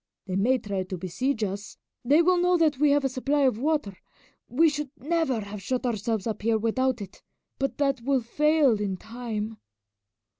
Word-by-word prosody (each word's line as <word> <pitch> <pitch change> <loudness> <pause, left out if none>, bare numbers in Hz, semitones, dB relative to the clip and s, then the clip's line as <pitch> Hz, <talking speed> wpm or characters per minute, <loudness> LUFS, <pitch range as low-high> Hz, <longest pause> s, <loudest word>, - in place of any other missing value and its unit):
They 185 -2 -3
may 240 +7 +3
try 200 -5 -3
to 185 0 -5
besiege 220 +8 -2
us. 200 +1 -5 0.3
They 290 +7 +4
will 360 +1 +3
know 360 0 +3
that 310 -5 +2
we 300 0 +4
have 285 -1 +3
a - - +4
supply 275 +3 0
of 255 -5 +2
water 295 -8 0 0.5
we 315 +7 +4
should 295 -2 -2
never 290 -4 0
have 200 0 -7
shut 255 +6 -2
ourselves 220 -2 -1
up 220 -2 -3
here 225 +1 +2
without 235 +1 0
it 190 - -13 0.4
but 275 0 -1
that 275 -3 +1
will 265 +1 +1
fail 290 -2 +2
in 195 -2 -2
time." 220 -1 -5
250 Hz, 185 wpm, -26 LUFS, 210-285 Hz, 0.5 s, They